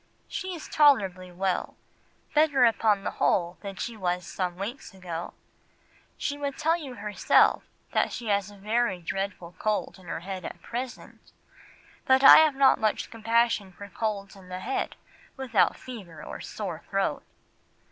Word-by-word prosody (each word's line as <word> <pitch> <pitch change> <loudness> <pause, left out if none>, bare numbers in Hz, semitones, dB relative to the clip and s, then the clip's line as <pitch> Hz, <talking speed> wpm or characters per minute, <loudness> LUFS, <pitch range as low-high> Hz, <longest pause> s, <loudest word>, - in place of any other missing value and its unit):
She 375 -1 -4
is 320 - -9
tolerably 195 -12 +3
well, 185 +1 -2 0.6
better 295 -4 +5
upon 220 -3 +2
the - - -2
whole 175 -1 +1
than 200 -1 -6
she 230 +4 -4
was 180 -3 -2
some 180 0 -3
weeks 200 +3 -6
ago. 175 -3 -6 0.8
She 285 0 -3
would 280 -1 -3
tell 320 +2 +2
you 285 -7 -7
herself 210 -2 +3 0.3
that - - +1
she 240 - -6
has 200 -1 +1
a 205 - -14
very 215 -1 0
dreadful 185 0 -4
cold 215 -2 -1
in 180 - -16
her 165 - -4
head 190 0 -6
at - - -7
present, 245 +1 -7 0.8
but 265 0 +5
I - - +11
have 310 -3 +5
not 270 0 +5
much 215 -1 0
compassion 225 -3 +1
for 200 +3 -10
colds 200 0 -3
in 190 -2 -15
the 185 0 -5
head 265 +6 -2 0.4
without 245 -7 +2
fever 190 -11 -10
or - - -7
sore - - -5
throat." - - 0
205 Hz, 155 wpm, -27 LUFS, 185-255 Hz, 0.8 s, I